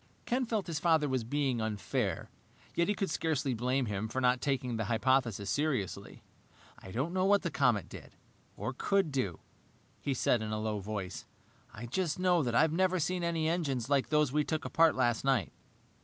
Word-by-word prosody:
Ken 250 Hz, 0 st, 0 dB
felt 220 Hz, -4 st, -1 dB
his 165 Hz, -3 st, -3 dB
father 160 Hz, -3 st, +3 dB
was 130 Hz, -3 st, 0 dB
being 130 Hz, -1 st, 0 dB
unfair, 105 Hz, -3 st, -2 dB, 0.4 s
yet 170 Hz, -, +1 dB
he 205 Hz, -, +1 dB
could 195 Hz, -4 st, -2 dB
scarcely 155 Hz, -5 st, 0 dB
blame 125 Hz, +3 st, 0 dB
him 105 Hz, 0 st, -2 dB
for 120 Hz, +4 st, -3 dB
not 125 Hz, -1 st, +2 dB
taking 130 Hz, -4 st, -1 dB
the 110 Hz, -1 st, -2 dB
hypothesis 115 Hz, -2 st, +1 dB
seriously. 140 Hz, -, -2 dB, 0.6 s
"I -, -, -11 dB
don't 130 Hz, -, -2 dB
know 185 Hz, 0 st, +1 dB
what 200 Hz, 0 st, +4 dB
the 170 Hz, -, -2 dB
comet 125 Hz, -7 st, +2 dB
did -, -, -11 dB, 0.4 s
or 110 Hz, +7 st, -3 dB
could 195 Hz, +4 st, +1 dB
do 115 Hz, -, -2 dB, 0.3 s
" -, -, -34 dB
he 140 Hz, -, -1 dB
said 120 Hz, -1 st, +2 dB
in 110 Hz, -, -3 dB
a 110 Hz, -, -1 dB
low 110 Hz, -1 st, -2 dB
voice. 100 Hz, -2 st, -5 dB, 0.5 s
"I 110 Hz, +2 st, -8 dB
just 155 Hz, +6 st, -1 dB
know 180 Hz, -3 st, +3 dB
I've 155 Hz, +7 st, +3 dB
never 185 Hz, +1 st, +2 dB
seen 180 Hz, +2 st, -1 dB
any 165 Hz, -2 st, 0 dB
engines 145 Hz, -7 st, -1 dB
like 140 Hz, -2 st, +2 dB
those 150 Hz, -3 st, +3 dB
we 150 Hz, +1 st, +2 dB
took 155 Hz, +1 st, -3 dB
apart 165 Hz, -1 st, +4 dB
last 120 Hz, -3 st, +1 dB
night." 135 Hz, -6 st, +1 dB
135 Hz, 190 wpm, -31 LUFS, 115-165 Hz, 0.6 s, what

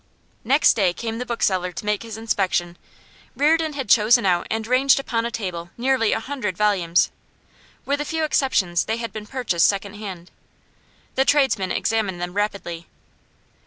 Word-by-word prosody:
Next 275 Hz, +6 st, +4 dB
day 190 Hz, -5 st, +1 dB
came 225 Hz, +3 st, -5 dB
the 250 Hz, -, -5 dB
bookseller 185 Hz, -6 st, 0 dB
to 210 Hz, -, -7 dB
make 210 Hz, -1 st, 0 dB
his 225 Hz, -2 st, -7 dB
inspection. 190 Hz, -6 st, -1 dB, 0.6 s
Reardon 315 Hz, +2 st, +2 dB
had 270 Hz, -4 st, -4 dB
chosen 210 Hz, 0 st, +5 dB
out 175 Hz, -2 st, +1 dB
and 220 Hz, 0 st, -2 dB
ranged 260 Hz, +3 st, +4 dB
upon 235 Hz, -4 st, -1 dB
a -, -, -4 dB
table 180 Hz, -7 st, -5 dB
nearly 250 Hz, -2 st, +1 dB
a -, -, +1 dB
hundred 225 Hz, -7 st, -4 dB
volumes. 185 Hz, -5 st, +2 dB, 0.7 s
With 285 Hz, +1 st, -1 dB
a -, -, -3 dB
few 320 Hz, +1 st, -2 dB
exceptions, 195 Hz, -, +1 dB
they 220 Hz, -, -1 dB
had 230 Hz, -1 st, -5 dB
been 215 Hz, -1 st, -7 dB
purchased 210 Hz, -11 st, +1 dB
second 200 Hz, 0 st, -2 dB
hand. 190 Hz, -5 st, -8 dB, 0.8 s
The 265 Hz, -, +2 dB
tradesman 265 Hz, -10 st, +2 dB
examined 210 Hz, -5 st, -1 dB
them 175 Hz, 0 st, -4 dB
rapidly. 200 Hz, -5 st, -3 dB
215 Hz, 160 wpm, -22 LUFS, 185-255 Hz, 0.8 s, chosen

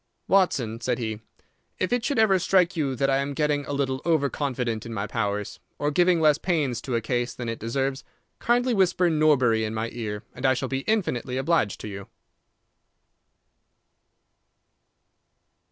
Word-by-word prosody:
"Watson," 130 Hz, -, +2 dB
said 125 Hz, 0 st, 0 dB
he, 110 Hz, -3 st, -4 dB, 0.6 s
"if 185 Hz, -, -1 dB
it 245 Hz, -2 st, +1 dB
should 280 Hz, +1 st, -1 dB
ever 205 Hz, -4 st, +4 dB
strike 185 Hz, 0 st, +2 dB
you 140 Hz, -5 st, -1 dB
that 135 Hz, +3 st, +1 dB
I 135 Hz, -, +3 dB
am 140 Hz, +1 st, -2 dB
getting 150 Hz, -1 st, 0 dB
a -, -, -4 dB
little 135 Hz, -2 st, -1 dB
over 155 Hz, -6 st, +1 dB
confident 125 Hz, -6 st, -2 dB
in 115 Hz, -1 st, -7 dB
my 100 Hz, 0 st, -2 dB
powers, 105 Hz, -3 st, -3 dB, 0.2 s
or 145 Hz, 0 st, 0 dB
giving 175 Hz, +2 st, +3 dB
less 155 Hz, -1 st, +4 dB
pains 145 Hz, -10 st, 0 dB
to 125 Hz, -1 st, -3 dB
a 115 Hz, -, +1 dB
case 120 Hz, +2 st, -2 dB
than 120 Hz, -, -5 dB
it 115 Hz, 0 st, -4 dB
deserves, 135 Hz, +3 st, -2 dB, 0.4 s
kindly 245 Hz, +1 st, +2 dB
whisper 185 Hz, -3 st, +2 dB
'Norbury' 135 Hz, -8 st, +3 dB
in 110 Hz, 0 st, -3 dB
my 110 Hz, +1 st, -3 dB
ear, 105 Hz, -3 st, -5 dB
and 125 Hz, -, -10 dB
I 130 Hz, -1 st, +4 dB
shall 130 Hz, 0 st, -3 dB
be 135 Hz, -, -1 dB
infinitely 130 Hz, -, 0 dB
obliged 135 Hz, -, +1 dB
to -, -, -6 dB
you." 100 Hz, -1 st, -7 dB
135 Hz, 170 wpm, -25 LUFS, 115-165 Hz, 0.6 s, ever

